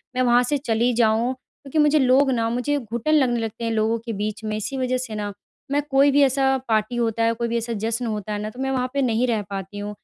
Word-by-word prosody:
मैं 255 - +1
वहाँ 245 0 +4
से 285 +4 0
चली 240 -2 +1
जाऊँ 230 +2 +2
क्योंकि 275 +3 -10
मुझे 300 0 +4
लोग 265 +1 +4
ना 230 -2 0
मुझे 250 +5 0
घुटन 235 +5 -2
लगने 255 -6 +3
लगते 225 +1 -5
हैं 230 - -1
लोगों 225 +1 +1
के 230 - -3
बीच 210 +1 -4
में। 215 0 -2
इसी 240 +6 -4
वजह 255 -1 0
से 250 -4 -5
ना, 205 -1 -4 0.4
मैं 290 +1 +2
कोई 275 +1 +4
भी 285 +1 +4
ऐसा 270 0 +2
पार्टी 220 +1 0
होता 230 -1 0
है, 230 0 +3
कोई 235 +1 -2
भी 235 - -1
ऐसा 235 0 -3
जश्न 225 +3 -2
होता 210 -2 -3
है 205 - -3
ना, 210 - -4
तो 245 - -13
मैं 270 0 -1
वहाँ 255 -1 0
पे 280 - 0
नहीं 245 0 +1
रह 225 -3 0
पाती 195 0 -6
हूँ। 205 0 -4
235 Hz, 265 wpm, -23 LUFS, 220-260 Hz, 0.4 s, वहाँ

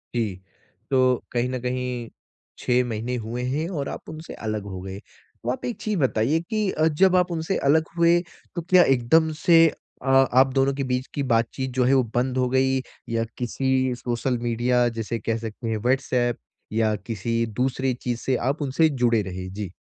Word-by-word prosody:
जी, 110 -5 0 0.6
तो 130 -2 +3
कहीं 120 +1 0
न 130 -1 -3
कहीं 125 -2 -3 0.5
6 125 0 +2
महीने 115 +3 -3
हुए 120 +2 -4
हैं 155 +5 -1
और 145 -7 -3
आप - - -8
उनसे 160 +1 -8
अलग 110 -1 -2
हो 95 -2 -6
गए। 95 +1 -7 0.4
तो 120 - -2
आप 130 - -4
एक 240 -4 -3
चीज़ 210 -5 -1
बताइए 130 +3 +2
कि 210 +3 -1
अ, 155 +1 +2
जब 185 +4 +3
आप 180 -1 +2
उनसे 165 +3 -1
अलग 160 +2 +5
हुए 170 +1 +5 0.4
तो 170 - -2
क्या 180 +1 +5
एकदम 135 +5 +3
से 165 -1 +7 0.4
अ, - - -6
आप 135 0 +4
दोनों 135 0 +2
के 135 0 -2
बीच 125 +1 -1
की 140 - -1
बातचीत 125 +3 0
जो 125 -1 +2
है, 130 +2 +3
वो 130 - +4
बंद 130 +1 0
हो 125 -1 +1
गई 130 0 +2 0.3
या 115 0 0
किसी 130 +1 0
सोशल 120 +1 -2
मीडिया 120 +1 +2
जैसे 115 +1 -3
कह 115 +1 -1
सकते 115 +1 -6
हैं, 110 - 0
व्हाट्सऐप 125 0 +1 0.4
या 110 -1 +2
किसी 115 +2 -2
दूसरी 130 0 +1
चीज़ 120 -1 -4
से 130 - 0
आप 150 +2 -2
उनसे 145 +3 +2
जुड़े 120 -5 +2
रहे? 95 -1 -6
जी। 100 -2 -6
125 Hz, 190 wpm, -24 LUFS, 115-140 Hz, 0.6 s, से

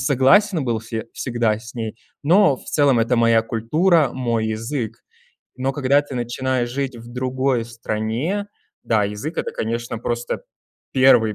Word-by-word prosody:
согласен 145 - +4
был 115 -3 -1
се 115 0 -5
всегда 120 -3 0
с 110 0 -12
ней, 110 -2 -4 0.3
но 175 -2 +5
в - - -16
целом 140 -5 +3
это 115 +2 +2
моя 115 -1 +4
культура, 150 - +2
мой 115 -3 -1
язык. 115 +1 -3 0.6
Но 130 +1 -1
когда 140 +1 +3
ты 145 -2 -9
начинаешь 120 +1 -1
жить 135 0 -3
в 120 +1 -11
другой 130 -1 0
стране, 115 - -3 0.3
да, 110 -2 +2
язык- 105 +11 -4
это, - - -2
конечно, 115 +1 -3
просто 120 +1 -3 0.5
1 120 -5 +5
120 Hz, 150 wpm, -21 LUFS, 115-135 Hz, 0.6 s, но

